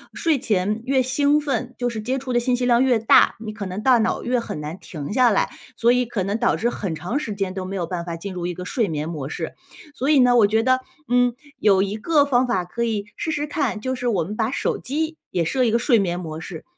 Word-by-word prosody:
睡 320 Hz, -4 st, +1 dB
前 210 Hz, 0 st, 0 dB
越 265 Hz, -1 st, +3 dB
兴 285 Hz, +3 st, +2 dB
奋， 255 Hz, -4 st, -3 dB
就 245 Hz, -1 st, 0 dB
是 225 Hz, -2 st, -5 dB
接 255 Hz, +5 st, -1 dB
触 260 Hz, -1 st, -4 dB
的 240 Hz, -, +4 dB
信 245 Hz, +1 st, +1 dB
息 250 Hz, -, -1 dB
量 245 Hz, 0 st, +4 dB
越 255 Hz, -3 st, +3 dB
大， 220 Hz, 0 st, +5 dB
你 215 Hz, -1 st, -6 dB
可 210 Hz, -3 st, -5 dB
能 190 Hz, +3 st, -5 dB
大 250 Hz, -2 st, +5 dB
脑 220 Hz, -, 0 dB
越 245 Hz, 0 st, +1 dB
很 230 Hz, -, -5 dB
难 150 Hz, +5 st, -6 dB
停 150 Hz, +2 st, -7 dB
下 250 Hz, 0 st, +5 dB
来， 205 Hz, -, +1 dB, 0.3 s
所 235 Hz, +1 st, +4 dB
以 250 Hz, 0 st, +2 dB
可 220 Hz, -5 st, -2 dB
能 200 Hz, +4 st, -2 dB
导 -, -, +2 dB
致 240 Hz, +1 st, 0 dB
很 190 Hz, -9 st, -3 dB
长 180 Hz, -, -2 dB
时 220 Hz, -9 st, -4 dB
间 195 Hz, -2 st, -2 dB
都 190 Hz, -1 st, -4 dB
没 190 Hz, +1 st, -5 dB
有 180 Hz, -3 st, -1 dB
办 170 Hz, 0 st, -4 dB
法 170 Hz, -1 st, -5 dB
进 190 Hz, +3 st, -6 dB
入 175 Hz, -1 st, -3 dB
一 175 Hz, -, -3 dB
个 180 Hz, -, -7 dB
睡 220 Hz, +2 st, 0 dB
眠 155 Hz, -1 st, -3 dB
模 150 Hz, -5 st, -5 dB
式。 -, -, -5 dB, 0.4 s
所 270 Hz, +1 st, -2 dB
以 300 Hz, -2 st, +5 dB
呢， 250 Hz, -1 st, +5 dB
我 210 Hz, -, +6 dB
觉 220 Hz, +2 st, +2 dB
得， 255 Hz, +1 st, +3 dB, 0.3 s
嗯， 245 Hz, -1 st, +3 dB, 0.2 s
有 195 Hz, -2 st, +4 dB
一 200 Hz, +1 st, -3 dB
个 290 Hz, +5 st, +3 dB
方 255 Hz, -2 st, +2 dB
法 190 Hz, -7 st, 0 dB
可 235 Hz, +7 st, -3 dB
以 215 Hz, -3 st, -1 dB
试 -, -, -4 dB
试 295 Hz, -1 st, -1 dB
看， 285 Hz, -7 st, -2 dB
就 260 Hz, +4 st, -2 dB
是 250 Hz, -1 st, -3 dB
我 195 Hz, -8 st, +1 dB
们 200 Hz, +6 st, -6 dB
把 220 Hz, +1 st, 0 dB
手 280 Hz, -, -1 dB
机 315 Hz, +4 st, -3 dB
也 170 Hz, -2 st, 0 dB
设 255 Hz, +10 st, +1 dB
一 240 Hz, -, +3 dB
个 230 Hz, -, +3 dB
睡 240 Hz, 0 st, +3 dB
眠 175 Hz, -2 st, -1 dB
模 160 Hz, -3 st, -6 dB
式， 160 Hz, 0 st, -8 dB
225 Hz, 290 characters per minute, -22 LUFS, 190-255 Hz, 0.4 s, 我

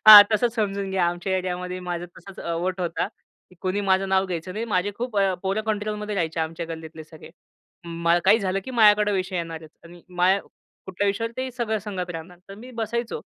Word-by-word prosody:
हां. 210 Hz, -1 st, +14 dB
तसंच 235 Hz, +2 st, +2 dB
समजून 200 Hz, -3 st, -1 dB
घ्या. 190 Hz, -2 st, +2 dB
आमच्या 175 Hz, +2 st, -1 dB
एरियामध्ये 180 Hz, 0 st, -3 dB
माझा 175 Hz, -1 st, -4 dB
तसाच 195 Hz, -1 st, -12 dB
अ, 170 Hz, -, -3 dB
वट 185 Hz, +1 st, -2 dB
होता. 170 Hz, -2 st, -1 dB, 0.5 s
कुणी 190 Hz, +2 st, -1 dB
माझं 190 Hz, -1 st, +2 dB
नाव 190 Hz, 0 st, +3 dB
घ्यायचं 180 Hz, 0 st, -4 dB
नाही. 220 Hz, +3 st, -3 dB
माझे 205 Hz, -2 st, 0 dB
खूप 240 Hz, -3 st, -3 dB
अ, 195 Hz, -2 st, +3 dB
पोरं 195 Hz, +3 st, 0 dB
कंट्रोलमध्ये 210 Hz, 0 st, -2 dB
राहायचे 165 Hz, -3 st, -1 dB
आमच्या 165 Hz, +1 st, -3 dB
गल्लीतले 160 Hz, -1 st, -8 dB
सगळे. 155 Hz, +1 st, -13 dB, 0.5 s
अं, 170 Hz, 0 st, +1 dB
काही 210 Hz, +4 st, +6 dB
झालं 195 Hz, -1 st, -1 dB
की 260 Hz, -, -6 dB
माझ्याकडे 210 Hz, -3 st, +5 dB
विषय 185 Hz, -1 st, -1 dB
येणारच 165 Hz, -2 st, -5 dB
आणि 170 Hz, 0 st, -14 dB
माझ्या 185 Hz, +2 st, +4 dB, 0.5 s
कुठल्या 190 Hz, +2 st, -1 dB
विषयावर 225 Hz, +4 st, -1 dB
ते 260 Hz, 0 st, -2 dB
सगळं 235 Hz, -3 st, -1 dB
संगत 185 Hz, -4 st, -5 dB
राहणार. 170 Hz, +1 st, -8 dB
तर 195 Hz, -, -8 dB
मी 255 Hz, -, -10 dB
बसायचो 235 Hz, +2 st, -2 dB
190 Hz, 195 wpm, -24 LUFS, 175-210 Hz, 0.5 s, हां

